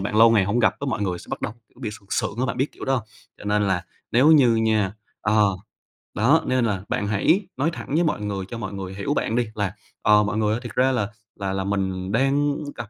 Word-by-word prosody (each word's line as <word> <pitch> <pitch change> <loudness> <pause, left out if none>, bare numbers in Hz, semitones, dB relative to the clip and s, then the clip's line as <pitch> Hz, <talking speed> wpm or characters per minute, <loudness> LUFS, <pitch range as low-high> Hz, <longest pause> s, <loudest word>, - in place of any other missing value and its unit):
bạn 105 +2 -2
lâu 115 +1 +8
ngày 105 -4 +4
hông 105 +5 0
gặp 110 - +3
cái 140 - -3
mọi 105 - -1
người 90 -3 -1
sẽ - - -13
bắt - - -4
đầu, - - -3 0.2
kiểu, - - -34
bị 105 - -3
sượng 100 -2 -13
sượng 100 - -1
á, 130 - +1
bạn - - -3
biết 135 +3 -1
kiểu - - -8
đó 135 - +1
hông? 120 - -1 0.4
Cho - - -12
nên 105 0 +2
là 95 -3 +1 0.3
nếu 130 +6 +5
như 125 -6 +6
nha 110 -3 +2 0.3
ờ, 105 -1 +3 0.7
đó, 135 +10 +4
nên 130 -2 +2
là 100 -3 -1
bạn 105 - -1
hãy 165 - +2
nói 145 +5 +2
thẳng - - -7
với 170 - +3
mọi 150 -9 0
người 100 -2 -3
cho 120 - -5
mọi 105 -3 -5
người 95 -1 -6
hiểu 100 +8 -1
bạn 115 - -1
đi 120 -2 +1
là 100 -2 -1 0.3
"Ờ, 105 0 +5
mọi 105 +1 -2
người 105 -1 +2
ơi, 115 - -1
thiệt 120 -2 -7
ra 130 +1 +3
là 105 -6 0 0.3
là 95 -1 -2
là 95 - -1
mình 95 -1 -2
đang 140 +4 +2 0.2
gặp 105 - -7
105 Hz, 265 wpm, -23 LUFS, 100-125 Hz, 0.7 s, lâu